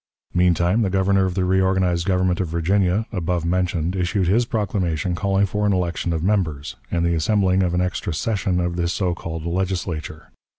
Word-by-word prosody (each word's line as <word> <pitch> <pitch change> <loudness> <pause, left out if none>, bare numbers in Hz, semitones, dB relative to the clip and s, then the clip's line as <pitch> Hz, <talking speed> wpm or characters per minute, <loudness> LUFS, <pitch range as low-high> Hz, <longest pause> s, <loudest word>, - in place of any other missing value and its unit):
Meantime 90 +4 +2
the 100 - +1
Governor 95 0 +2
of 90 -1 -2
the 95 - +1
reorganized 95 -2 +1
government 90 -1 +1
of 95 - 0
Virginia, 90 +5 +1
above 90 -4 -2
mentioned, 90 -1 0
issued 90 0 0
his 115 +7 +3
proclamation 95 -7 -1
calling 95 +2 +1
for 105 +2 -2
an 100 - +2
election 90 -1 -1
of 80 -1 -2
members, 80 -8 -1
and 85 0 0
the 85 - +2
assembling 95 +2 +2
of 90 -2 0
an 90 - +2
extra 90 -1 -2
session 95 +1 -1
of 85 0 -2
the 85 -1 0
so 90 0 0
called 80 -1 -6
Legislature. 85 -3 -3
90 Hz, 180 wpm, -22 LUFS, 85-95 Hz, -, his